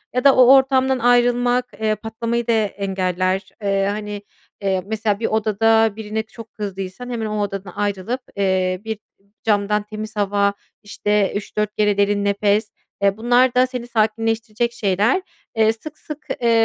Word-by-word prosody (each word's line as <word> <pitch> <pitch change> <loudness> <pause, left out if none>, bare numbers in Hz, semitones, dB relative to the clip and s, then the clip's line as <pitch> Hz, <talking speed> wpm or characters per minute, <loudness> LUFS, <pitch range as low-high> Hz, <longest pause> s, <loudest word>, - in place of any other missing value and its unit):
ya 250 - +1
da 275 -1 +6
o 255 +1 +7
ortamdan 265 -1 +3
ayrılmak, 245 +1 +3 0.2
eee, 215 -1 +1
patlamayı 230 +2 -3
da - - +3
engeller. 190 -3 -1
Eee, 195 -1 +1
hani, 210 0 -5 0.4
eee, 190 -1 0
mesela 210 -1 -1
bir 225 - -2
odada 220 0 +2
birine 220 0 -3
çok 225 0 -13
kızdıysan 195 +3 -6
hemen 235 -2 -3
o 210 -1 -2
odadan 195 -2 -5
ayrılıp, 205 +4 -2 0.2
eee, 185 -1 +1
bir 220 -1 -4 0.4
camdan 210 -1 +1
temiz 215 +1 -7
hava, 200 0 +1 0.3
işte, 205 -1 0
3-4 210 0 -3
kere 210 -1 +2
derin 205 0 +2
nefes. 205 +1 +1 0.3
Eee, 200 0 +2
bunlar 245 +2 +3
da 255 +1 +4
seni 250 -2 -6
sakinleştirecek 225 +1 0
şeyler. 210 - +1 0.3
Eee, 220 0 +4
sık 305 +7 -10
sık, 300 0 -9
eee, 235 - +2
215 Hz, 150 wpm, -20 LUFS, 200-235 Hz, 0.4 s, o